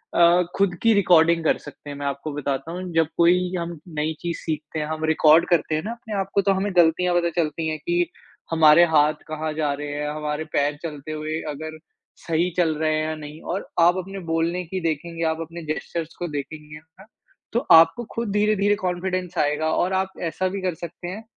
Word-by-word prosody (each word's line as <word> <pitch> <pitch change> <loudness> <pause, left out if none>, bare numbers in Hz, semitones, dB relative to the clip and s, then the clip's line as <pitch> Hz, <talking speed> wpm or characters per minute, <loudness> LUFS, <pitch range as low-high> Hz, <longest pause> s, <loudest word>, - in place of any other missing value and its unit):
अ, 175 +1 +5
खुद 195 -2 +2
की 230 -1 +5
रिकॉर्डिंग 170 -4 +4
कर 160 - +2
सकते 145 - -12
हैं, 145 - -6
मैं 145 - -5
आपको 140 +2 -3
बताता 140 +1 -3
हूँ 180 +2 -5
जब 165 -1 +3
कोई 180 +1 +3
हम 170 -1 -5 0.2
नई 155 +1 0
चीज़ 170 -1 -3
सीखते 155 -1 -4
हैं, 150 - -1
हम 155 0 -3
रिकॉर्ड 160 +1 +5
करते 165 -2 +2
हैं 155 - -2
ना 225 - -3
अपने 230 -2 -7
आप 195 0 -2
को 200 - +5
तो 195 0 +2
हमें 195 +2 -1
गलतियाँ 175 +1 +4
पता 170 -1 +2
चलती 160 +1 -2
हैं 155 - -2
कि 175 0 +2 0.5
हमारे 160 +1 +7
हाथ 150 +1 +5
कहाँ 155 0 -3
जा 150 -2 0
रहे 145 +1 -5
हैं, 150 0 -3
हमारे 150 0 -3
पैर 145 +1 +1
चलते 155 -2 -6
हुए 155 +1 -3
अगर 155 +2 -7 0.5
सही 170 +2 +1
चल 165 -3 +2
रहे 155 0 +1
हैं 155 - 0
या 155 - -3
नहीं, 150 0 -10
और 190 +3 -4
आप 175 +2 +5
अपने 195 +2 -5
बोलने 165 +2 0
की 185 +3 -4
देखेंगे, 165 +1 -3
आप 160 0 0
अपने 165 +1 -7
जेस्चर्स 165 0 -6
को 175 - -2
देखेंगे 150 +1 -7
ना 160 +5 -20 0.5
तो 235 +4 0
आपको 165 +7 +7
खुद 230 -3 -2
धीरे-धीरे 205 0 +2
कॉन्फिडेंस 185 -1 -3
आएगा। 150 +2 +1
और 185 +3 +1
आप 190 0 0 0.2
ऐसा 185 +3 -1
भी 195 0 -4
कर 185 -2 -1
सकते 170 +2 -8
हैं 205 +5 -6
165 Hz, 210 wpm, -23 LUFS, 155-180 Hz, 0.5 s, हमारे